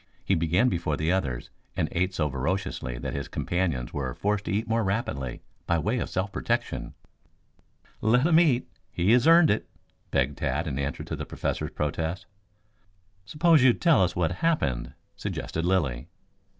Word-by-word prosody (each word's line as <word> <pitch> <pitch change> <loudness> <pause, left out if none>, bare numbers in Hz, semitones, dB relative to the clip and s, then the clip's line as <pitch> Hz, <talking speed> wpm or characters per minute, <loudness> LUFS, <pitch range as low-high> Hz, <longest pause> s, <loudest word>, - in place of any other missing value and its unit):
He - - +2
began 85 +7 +2
before 85 -8 -1
the 80 +2 0
others 65 -10 -2 0.3
and 80 - +1
ate 90 +2 0
so 75 -4 +1
voraciously 70 -2 -2
that - - -4
his 70 - -4
companions 85 -9 -2
were 65 -2 -3
forced 105 +4 -1
to - - -2
eat 105 +3 -1
more 115 0 +1
rapidly 95 - -2 0.2
by 85 - +2
way 110 +10 0
of - - -3
self 95 +2 -2
protection. - - -2 1.1
"Let 125 +5 +3
him 165 -1 +6
eat. 140 -8 +3 0.2
He 90 +5 +1
has 125 +4 +5
earned 165 -1 +7
it," 105 - -1 0.4
begged 70 +3 0
Tad 70 +3 -1
in 70 -4 -3
answer 70 0 -3
to - - -4
the - - -6
Professor's - - -3
protest. 80 +4 -3 1.0
"Suppose 155 - +4
you 130 -2 +7
tell 165 - +4
us 90 - 0
what 85 -2 +1
happened," 85 - 0 0.2
suggested 85 +1 -4
Lilly. 70 -8 0
90 Hz, 165 wpm, -27 LUFS, 75-110 Hz, 1.1 s, earned